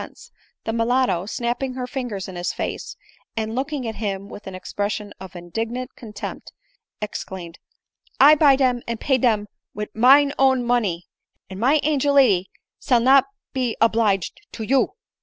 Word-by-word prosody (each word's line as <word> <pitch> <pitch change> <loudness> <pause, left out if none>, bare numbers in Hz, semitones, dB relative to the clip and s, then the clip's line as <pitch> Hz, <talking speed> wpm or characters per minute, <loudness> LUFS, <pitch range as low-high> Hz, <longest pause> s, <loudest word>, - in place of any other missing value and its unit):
ense - - -12 0.2
— - - -43
the 225 - -2
mulatto, 230 -5 +1
snapping 245 +3 -2
her 255 -1 -3
fingers 245 -7 -4
in 190 - -8
his 175 0 -2
face, - - -5 0.4
and 220 0 -1
ooking 270 +2 -3
at 220 - -5
him 200 -2 -3
with 205 - -11
an 190 - -6
expression 205 +2 -4
of 190 -1 -10
indignant 225 +9 -5
contempt, 210 -4 -8 0.5
exclaimed, 185 -4 -6 0.3
" - - -37
I 290 +3 +9
buy 290 -3 +6
dern, 255 -3 +1
and 235 -1 -3
pay 265 -2 +2
for - - -6
dem 220 -4 +2 0.3
wid 210 +1 -4
mine 280 +5 +6
nown 265 -2 +4
money; 210 -8 0 0.5
and 190 - -7
my 270 +7 +4
angel 285 -1 +2
lady 200 -9 +4 0.3
sail 245 -3 +3
no 265 +3 +6 0.3
be 255 -4 -1
oblige 220 -5 +2 0.2
to 225 - -5
you 265 - +2
235 Hz, 170 wpm, -22 LUFS, 205-260 Hz, 0.5 s, I